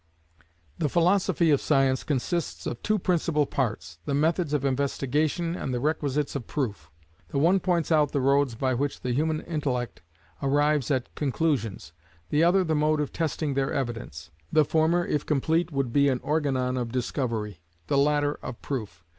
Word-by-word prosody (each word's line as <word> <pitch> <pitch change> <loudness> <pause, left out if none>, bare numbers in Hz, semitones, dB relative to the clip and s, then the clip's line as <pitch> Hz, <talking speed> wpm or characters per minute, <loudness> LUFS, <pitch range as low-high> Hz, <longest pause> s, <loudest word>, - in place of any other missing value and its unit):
The 150 - +1
philosophy 175 0 +3
of 140 - +3
Science 135 -3 +2
consists 155 +4 -2
of 120 - -4
two 215 0 +1
principal 170 -5 +1
parts; 105 - -3
the 140 - -1
methods 160 +2 +1
of 145 -2 0
investigation, 140 +5 0
and 135 - -4
the 125 - -1
requisites 145 0 -1
of 130 -5 -4
proof. 105 - -3 0.4
The - - -3
one 170 +7 +4
points 175 -3 0
out 150 -3 +3
the 140 - 0
roads 135 -2 +2
by 130 +2 0
which 140 +3 -2
the 125 - -2
human 155 +3 0
intellect 135 - -3 0.4
arrives 145 0 +2
at 130 -4 -1
conclusions, 135 - -1 0.4
the 150 +2 +3
other 185 +3 +4
the 160 -3 0
mode 155 0 +2
of 150 - -2
testing 155 -2 -1
their 135 0 0
evidence. 115 - -4 0.2
The 155 -1 +4
former 165 +3 +2
if 150 - -1
complete 160 +4 +1
would 135 -4 -1
be 140 0 +4
an 130 -2 0
Organon 135 -4 0
of 120 -2 -2
Discovery, 115 - -2 0.2
the 140 - +1
latter 145 0 +2
of 120 - -7
Proof. 105 - -5
145 Hz, 170 wpm, -26 LUFS, 130-155 Hz, 0.4 s, one